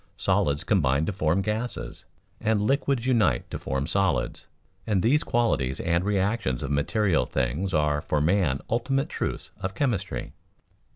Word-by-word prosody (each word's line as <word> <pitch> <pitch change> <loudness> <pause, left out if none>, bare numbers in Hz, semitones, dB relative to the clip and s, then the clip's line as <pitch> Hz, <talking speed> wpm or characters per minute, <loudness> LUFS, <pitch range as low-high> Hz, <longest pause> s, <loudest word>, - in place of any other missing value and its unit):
Solids 70 0 +1
combine 75 -7 +2
to 105 - -1
form 90 0 +1
gases, 110 +4 -4 0.3
and 110 -1 +1
liquids 135 0 +1
unite 110 - +2
to - - -4
form 65 +1 -2
solids, 95 +1 0 0.4
and 100 -5 +1
these 140 +7 +3
qualities 70 - 0
and 85 +1 +1
reactions 100 - 0
of 70 - -3
material 85 +5 +1
things 70 +9 -1
are 75 -3 +1
for 75 - 0
man 80 -3 +2
ultimate 135 +4 0
truths - - -4
of 95 0 -3
chemistry. 100 - -2
95 Hz, 140 wpm, -26 LUFS, 75-110 Hz, 0.4 s, these